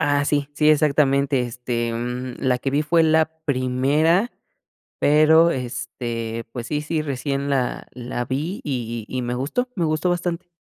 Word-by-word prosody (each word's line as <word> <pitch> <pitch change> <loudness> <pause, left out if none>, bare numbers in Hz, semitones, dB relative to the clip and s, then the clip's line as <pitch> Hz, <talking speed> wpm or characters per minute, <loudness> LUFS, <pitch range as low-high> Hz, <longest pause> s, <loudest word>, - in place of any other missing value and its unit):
Ah, 145 0 +2
sí, 145 -1 0
sí, 150 0 +3
exactamente, 140 -2 +3
este, 120 -1 -2
mm, 125 +2 -4
la 125 -2 +1
que 135 - -2
vi 145 +2 +1
fue 165 +2 +3
la 160 0 +3
primera, 145 - +2 0.7
pero, 155 +3 +5
este, 120 -2 -4
pues 120 -1 -5
sí 150 0 -1
sí, 155 +1 -2
recién 140 0 -2
la 130 -3 -1
la 120 0 -4
vi 150 +10 -3
y 120 -5 -3
y 130 -1 -3
me 120 0 -2
gustó 150 - -1
me 175 - 0
gustó 155 +3 +1
bastante. 175 0 -2
140 Hz, 160 wpm, -22 LUFS, 125-155 Hz, 0.7 s, pero